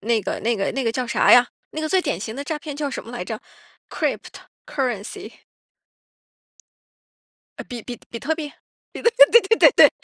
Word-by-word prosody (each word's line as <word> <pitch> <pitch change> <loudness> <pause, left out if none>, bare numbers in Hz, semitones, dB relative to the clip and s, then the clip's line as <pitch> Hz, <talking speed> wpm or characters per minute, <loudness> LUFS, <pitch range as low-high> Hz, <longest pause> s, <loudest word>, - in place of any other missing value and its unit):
那 225 +2 +1
个， - - -4
那 230 0 +1
个 195 - -2
那 270 - -2
个 230 - 0
叫 250 +2 -3
啥 - - +2
呀， 245 0 +7 0.3
那 310 - -4
个 310 - -1
最 375 +4 +2
典 175 - -2
型 220 +2 -6
的 280 - -5
诈 310 +1 -4
骗 295 -1 -8
叫 290 -1 -3
什 - - -6
么 230 - -11
来 240 - -5
着？ 220 +3 -5 0.5
cryptocurrency。 245 -7 -5 2.2
呃， - - -6
比 240 -2 -8
比 245 +1 -8
比 230 - -6
特 320 +7 -1
币， 305 -2 -7 0.6
比 470 - -24
特 - - +8
对 470 - +9
对 450 +4 +2
对 - - +8
对。 - - +7
255 Hz, 285 characters per minute, -22 LUFS, 230-310 Hz, 2.2 s, 对